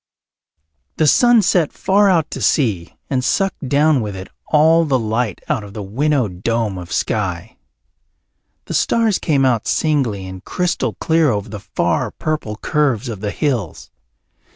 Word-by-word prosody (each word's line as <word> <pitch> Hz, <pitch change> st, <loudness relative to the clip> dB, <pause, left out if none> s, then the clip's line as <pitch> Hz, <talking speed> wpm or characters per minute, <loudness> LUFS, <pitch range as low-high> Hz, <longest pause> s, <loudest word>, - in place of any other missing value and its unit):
The 155 Hz, -, +2 dB
sun 240 Hz, -, +5 dB
set 170 Hz, -3 st, +2 dB
far 200 Hz, +1 st, +2 dB
out 165 Hz, -4 st, +1 dB
to -, -, -5 dB
sea 105 Hz, -, 0 dB
and 130 Hz, -2 st, -1 dB
sucked 195 Hz, -3 st, -1 dB
down 145 Hz, -1 st, +3 dB
with 105 Hz, -3 st, -5 dB
it 95 Hz, +1 st, -8 dB, 0.2 s
all 160 Hz, +2 st, +4 dB
the 140 Hz, -5 st, +1 dB
light 110 Hz, -2 st, -2 dB
out 110 Hz, -, -1 dB
of 100 Hz, -1 st, -11 dB
the 105 Hz, -, -5 dB
winnowed 115 Hz, -3 st, -1 dB
dome 115 Hz, -4 st, -1 dB
of 90 Hz, -, -10 dB
sky. -, -, -2 dB, 1.1 s
The -, -, -6 dB
stars 225 Hz, -4 st, +2 dB
came 140 Hz, -4 st, +1 dB
out 120 Hz, -4 st, +1 dB
singly 130 Hz, -11 st, 0 dB
and 95 Hz, 0 st, -9 dB
crystal 180 Hz, -1 st, -1 dB
clear 160 Hz, -2 st, +2 dB
over 105 Hz, -4 st, -2 dB
the 105 Hz, 0 st, -7 dB
far -, -, -1 dB
purple 155 Hz, -9 st, -4 dB
curves 135 Hz, -1 st, 0 dB
of 110 Hz, -4 st, -6 dB
the 105 Hz, -, -2 dB
hills. 115 Hz, -, -3 dB
130 Hz, 155 wpm, -18 LUFS, 105-155 Hz, 1.1 s, sun